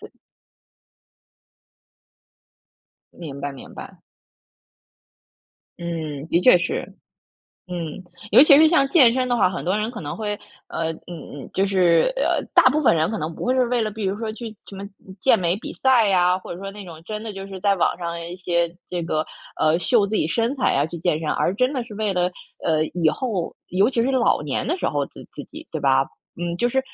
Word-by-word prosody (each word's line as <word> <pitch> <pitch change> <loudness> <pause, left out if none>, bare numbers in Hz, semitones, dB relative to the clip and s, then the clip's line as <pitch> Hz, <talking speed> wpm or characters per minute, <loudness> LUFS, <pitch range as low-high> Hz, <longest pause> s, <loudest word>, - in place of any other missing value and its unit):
对。 - - -12 3.0
明 140 -5 -8
白 140 0 -3
明 135 - -12
白。 - - -11 1.8
嗯， 160 -4 -5
的 170 - +2
确 180 -1 +7
是， 180 - -2 0.9
嗯， 175 -1 -5 0.3
尤 - - +8
其 290 -2 +8
是 315 +2 +7
像 310 -5 +3
健 270 -6 +6
身 255 0 0
的 245 - +1
话， 185 - +3
很 180 - -5
多 185 +3 +1
人 215 +2 -1
可 225 -3 -8
能 145 -3 -5
会 210 -2 -3 0.3
呃， 165 0 -2
嗯， 160 - -13 0.3
嗯， 145 - -9
就 195 - +1
是， 185 - +3
呃， - - +1
大 - - +7
部 300 +3 +1
分 255 - +5
人 160 +3 +1
可 220 - -3
能 160 0 -4
不 - - -6
会 250 - +2
是 255 -1 +3
为 240 -1 0
了 215 - -1
比 215 0 -6
如 195 +1 -1
说 220 0 -4
去 225 -1 -8
什 195 - -9
么 195 - -6 0.3
健 235 +5 +4
美 175 0 0
比 215 - -7
赛 245 -6 +3
啊， 180 0 +3
或 185 - -8
者 175 - -10
说 195 0 -5
那 205 0 -10
种 165 -3 -11
真 215 +2 -5
的 220 - -5
就 195 0 -7
是 195 -1 -8
在 200 +1 +3
网 185 - +1
上 170 -1 -4
一 175 +1 -7
些 170 -2 0 0.2
这 175 -1 -3
个， 155 -1 -1 0.3
呃， 155 +1 +3
秀 210 +3 +3
自 210 - -4
己 160 - +1
身 230 +8 0
材 260 - +1
啊 140 +2 +2
去 165 - -7
健 165 -2 0
身， 160 -1 -4
而 180 - +1
真 255 +6 +1
的 260 -4 -2
是 230 -2 -12
为 215 -2 0
了， 180 0 +1 0.3
呃， 155 -1 +2
以 165 -3 +3
后 215 -10 -3
尤 195 +6 +2
其 240 - 0
是 255 +4 +1
老 250 - +2
年 145 - -2
的 335 - 0
时 - - -1
候 145 -1 0
的 - - -28 0.2
自 - - -7
己， - - -10
对 - - -3
吧， - - +3 0.4
嗯， 175 0 -2
就 240 +7 +1
是 265 +2 +1
190 Hz, 230 characters per minute, -22 LUFS, 170-230 Hz, 3.0 s, 尤